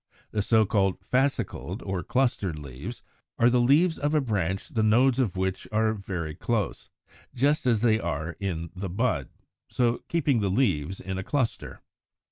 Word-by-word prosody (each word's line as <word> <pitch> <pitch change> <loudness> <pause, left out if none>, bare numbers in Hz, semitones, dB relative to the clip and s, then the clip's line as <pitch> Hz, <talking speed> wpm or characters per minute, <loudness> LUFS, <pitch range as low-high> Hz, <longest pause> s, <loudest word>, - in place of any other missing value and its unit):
The 105 - 0
so 110 +1 +4
called 95 -2 +1
Fascicled 135 +5 -1
or 95 -2 -2
Clustered 120 -11 0
leaves 75 - -8 0.3
are 120 +1 +4
the 125 0 +3
leaves 155 +7 +4
of 145 +2 0
a - - +5
branch 95 - -1
the 110 - 0
nodes 120 +4 +4
of 105 -8 0
which 95 0 -2
are 110 0 +2
very 90 -6 -4
close, 105 +5 -2 0.5
just 140 +2 +2
as 115 -4 +3
they 110 -2 +3
are 80 -2 -3
in 85 -5 -3
the 95 +1 -4
bud, 85 - 0 0.4
so 120 -1 +1
keeping 145 -7 +1
the 100 -2 0
leaves 95 - 0
in 95 0 -4
a - - -3
cluster. 130 +1 -2
110 Hz, 165 wpm, -27 LUFS, 95-125 Hz, 0.5 s, a